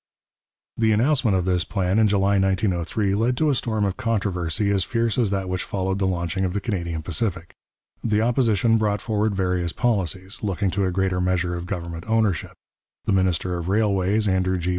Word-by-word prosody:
The 110 Hz, -1 st, +3 dB
announcement 120 Hz, -3 st, +2 dB
of 90 Hz, -, -1 dB
this 90 Hz, -2 st, +1 dB
plan 95 Hz, 0 st, 0 dB
in 110 Hz, -, +5 dB
July 100 Hz, 0 st, +2 dB
1903 95 Hz, +1 st, 0 dB
led 115 Hz, +5 st, +1 dB
to 155 Hz, +1 st, +2 dB
a -, -, +2 dB
storm 110 Hz, -4 st, -1 dB
of 95 Hz, -2 st, -2 dB
controversy 100 Hz, -3 st, -1 dB
as 100 Hz, -2 st, +2 dB
fierce 115 Hz, 0 st, 0 dB
as 115 Hz, -4 st, +2 dB
that 95 Hz, -1 st, -2 dB
which 90 Hz, 0 st, -2 dB
followed 95 Hz, 0 st, -2 dB
the 95 Hz, -, +1 dB
launching 90 Hz, +1 st, -1 dB
of 90 Hz, -1 st, -1 dB
the 100 Hz, -, 0 dB
Canadian 85 Hz, -7 st, -3 dB
Pacific. 90 Hz, +1 st, -2 dB, 0.5 s
The 105 Hz, -2 st, +1 dB
Opposition 115 Hz, -2 st, +2 dB
brought 105 Hz, -1 st, +1 dB
forward 110 Hz, -2 st, -1 dB
various 90 Hz, -3 st, 0 dB
policies, 95 Hz, -5 st, -2 dB
looking 100 Hz, -2 st, -1 dB
to 100 Hz, +1 st, 0 dB
a 95 Hz, -, 0 dB
greater 95 Hz, 0 st, 0 dB
measure 90 Hz, -1 st, 0 dB
of 85 Hz, 0 st, -5 dB
government 85 Hz, -4 st, -5 dB
ownership; 110 Hz, -6 st, 0 dB, 0.5 s
the -, -, +1 dB
minister 90 Hz, -1 st, +1 dB
of 85 Hz, +2 st, -4 dB
Railways, 105 Hz, 0 st, +2 dB
Andrew 95 Hz, -1 st, +1 dB
G. 90 Hz, 0 st, -2 dB
95 Hz, 185 wpm, -23 LUFS, 90-110 Hz, 0.5 s, in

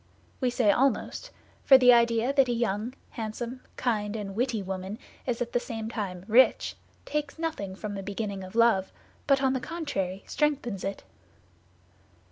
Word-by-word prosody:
We 255 Hz, -, +2 dB
say 240 Hz, -4 st, +3 dB
almost, 270 Hz, -, 0 dB, 0.3 s
for 265 Hz, -, +9 dB
the 250 Hz, -1 st, +7 dB
idea 235 Hz, +2 st, +3 dB
that 270 Hz, -3 st, +4 dB
a -, -, +2 dB
young, 230 Hz, +1 st, -1 dB, 0.2 s
handsome, 235 Hz, +3 st, -5 dB
kind, 210 Hz, -4 st, -1 dB
and 205 Hz, -3 st, -4 dB
witty 230 Hz, -1 st, -1 dB
woman 190 Hz, +2 st, -5 dB, 0.3 s
is 245 Hz, -1 st, 0 dB
at 235 Hz, -, -11 dB
the 245 Hz, -, +3 dB
same 225 Hz, -3 st, -5 dB
time 190 Hz, -5 st, -4 dB
rich 245 Hz, +4 st, +4 dB, 0.3 s
takes 300 Hz, -1 st, -3 dB
nothing 310 Hz, -13 st, -3 dB
from 205 Hz, +1 st, -5 dB
the 195 Hz, -, -4 dB
beginning 200 Hz, -1 st, -4 dB
of 185 Hz, +3 st, -10 dB
love, 230 Hz, -5 st, +4 dB, 0.4 s
but 275 Hz, -1 st, +4 dB
on 265 Hz, -1 st, +3 dB
the 260 Hz, -, 0 dB
contrary 245 Hz, -, -3 dB
strengthens 275 Hz, -, -1 dB
it. 195 Hz, 0 st, -4 dB
230 Hz, 160 wpm, -28 LUFS, 200-255 Hz, 0.4 s, for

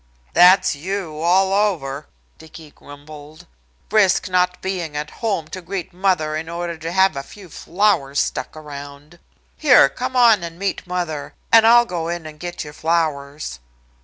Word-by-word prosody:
"That's 180 Hz, +2 st, +6 dB
you, 170 Hz, 0 st, -5 dB
all 190 Hz, +4 st, +2 dB
over," 160 Hz, -9 st, -1 dB, 0.3 s
Dicky 160 Hz, -1 st, -13 dB
grumbled. 145 Hz, +2 st, -13 dB, 0.5 s
"Risk 200 Hz, -4 st, +3 dB
not 180 Hz, 0 st, +1 dB
being 175 Hz, -6 st, -4 dB
at 150 Hz, 0 st, -5 dB
home 200 Hz, -9 st, -1 dB
to 185 Hz, -, -7 dB
greet 180 Hz, 0 st, -6 dB
mother 180 Hz, -5 st, 0 dB
in 160 Hz, +1 st, -5 dB
order 170 Hz, 0 st, -4 dB
to 165 Hz, +1 st, -6 dB
have 190 Hz, -1 st, +3 dB
a 140 Hz, -, -3 dB
few 190 Hz, +6 st, -14 dB
flowers 165 Hz, -5 st, 0 dB
stuck -, -, -3 dB
around. 145 Hz, +2 st, -11 dB, 0.4 s
Here, 255 Hz, -, +6 dB
come 255 Hz, -, -5 dB
on 235 Hz, -5 st, +5 dB
and 170 Hz, 0 st, -7 dB
meet 195 Hz, -1 st, -3 dB
mother, 175 Hz, -5 st, -4 dB, 0.2 s
and 225 Hz, -1 st, +7 dB
I'll 240 Hz, +1 st, +6 dB
go 170 Hz, -6 st, -4 dB
in 170 Hz, -1 st, -4 dB
and 155 Hz, -1 st, -10 dB
get 175 Hz, +1 st, -6 dB
your 150 Hz, -1 st, -10 dB
flowers." 150 Hz, -, -2 dB
170 Hz, 160 wpm, -20 LUFS, 150-190 Hz, 0.5 s, and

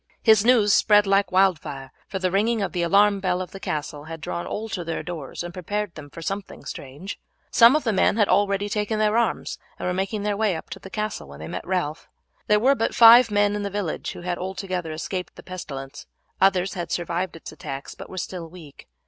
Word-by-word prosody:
His 220 Hz, -3 st, +6 dB
news 225 Hz, -4 st, +5 dB
spread 210 Hz, -1 st, +5 dB
like 195 Hz, -1 st, +2 dB
wild 185 Hz, -3 st, +4 dB
fire, 135 Hz, -3 st, -8 dB, 0.2 s
for 195 Hz, -, -4 dB
the 185 Hz, -1 st, 0 dB
ringing 220 Hz, +4 st, +2 dB
of -, -, -2 dB
the 175 Hz, -, -2 dB
alarm 200 Hz, +3 st, +4 dB
bell 180 Hz, -2 st, 0 dB
of 185 Hz, -, -5 dB
the 195 Hz, -, -9 dB
castle 150 Hz, -3 st, -4 dB
had 165 Hz, 0 st, -7 dB
drawn 170 Hz, +3 st, -4 dB
all 220 Hz, +2 st, -4 dB
to 185 Hz, -5 st, -3 dB
their 165 Hz, -1 st, -4 dB
doors 165 Hz, -2 st, -6 dB
and 175 Hz, 0 st, -7 dB
prepared 205 Hz, +2 st, -3 dB
them 145 Hz, -2 st, -10 dB
for 165 Hz, +3 st, -9 dB
something 195 Hz, +3 st, -5 dB
strange. 145 Hz, +10 st, -7 dB, 0.3 s
Some 235 Hz, +4 st, +7 dB
of 305 Hz, -, +1 dB
the 225 Hz, -, +1 dB
men 200 Hz, -, +3 dB
had 210 Hz, -3 st, +4 dB
already 200 Hz, +1 st, +2 dB
taken 210 Hz, +1 st, -1 dB
their 215 Hz, 0 st, +2 dB
arms 235 Hz, 0 st, 0 dB, 0.2 s
and -, -, -4 dB
were 180 Hz, -, 0 dB
making 195 Hz, +3 st, -2 dB
their 205 Hz, -1 st, 0 dB
way 210 Hz, -3 st, +1 dB
up 160 Hz, -, -8 dB
to -, -, -6 dB
the 190 Hz, -, -11 dB
castle 215 Hz, -, -4 dB
when 70 Hz, +1 st, -12 dB
they 80 Hz, -, -7 dB
met 90 Hz, -, -6 dB
Ralph. 175 Hz, -5 st, -2 dB, 0.4 s
There 210 Hz, 0 st, +4 dB
were 260 Hz, +5 st, +4 dB
but 225 Hz, -4 st, -1 dB
five 235 Hz, +1 st, +9 dB
men 205 Hz, 0 st, +2 dB
in 205 Hz, -, -2 dB
the 200 Hz, -, -2 dB
village 200 Hz, -5 st, -3 dB
who -, -, -9 dB
had 175 Hz, 0 st, -3 dB
altogether 185 Hz, -2 st, -4 dB
escaped 180 Hz, +4 st, -5 dB
the -, -, -12 dB
pestilence; 140 Hz, -7 st, -8 dB, 0.3 s
others 190 Hz, -1 st, +3 dB
had 175 Hz, -3 st, -5 dB
survived 175 Hz, +1 st, -2 dB
its 165 Hz, -, -9 dB
attacks, 140 Hz, -2 st, -7 dB
but -, -, -11 dB
were 190 Hz, -, -9 dB
still 175 Hz, -2 st, -5 dB
weak. 160 Hz, -5 st, -13 dB
190 Hz, 230 wpm, -24 LUFS, 170-205 Hz, 0.4 s, five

